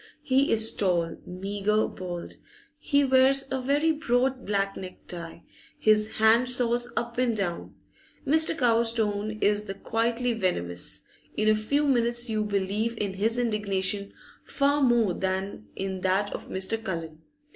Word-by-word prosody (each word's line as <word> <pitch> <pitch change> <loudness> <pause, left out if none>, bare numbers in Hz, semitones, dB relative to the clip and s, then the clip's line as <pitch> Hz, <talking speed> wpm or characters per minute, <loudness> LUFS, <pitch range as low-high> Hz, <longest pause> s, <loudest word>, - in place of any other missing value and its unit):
He 270 +2 +2
is 220 0 +3
tall, 175 -4 0
meagre, 200 +3 -1
bald; 175 -2 -7 0.4
he 285 -1 +2
wears 270 0 +4
a 265 -1 -1
very 290 +5 +2
broad 260 -4 0
black 195 -1 0
necktie, 175 -2 -8 0.4
his 215 0 +3
hand 225 +3 +4
saws 240 -1 +1
up 235 0 -2
and 240 -3 +1
down. 175 -4 -4 0.5
Mr. 315 +3 +4
Cowes' 230 -3 +3
tone 215 -1 -1
is 210 +1 +2
the 195 - -5
quietly 235 +3 -1
venomous; 90 - -1 0.4
in 215 - +1
a 215 - +6
few 280 +8 0
minutes 240 -3 +1
you 215 -1 0
believe 210 +3 -1
in 200 -3 -2
his 220 +5 0
indignation 200 -4 -1 0.3
far 285 +1 +1
more 240 -7 +3
than 190 - -3
in 190 -1 -4
that 190 +2 +1
of - - -7
Mr. 195 +4 -1
Cullen. 165 -6 -5
215 Hz, 145 wpm, -26 LUFS, 195-245 Hz, 0.5 s, a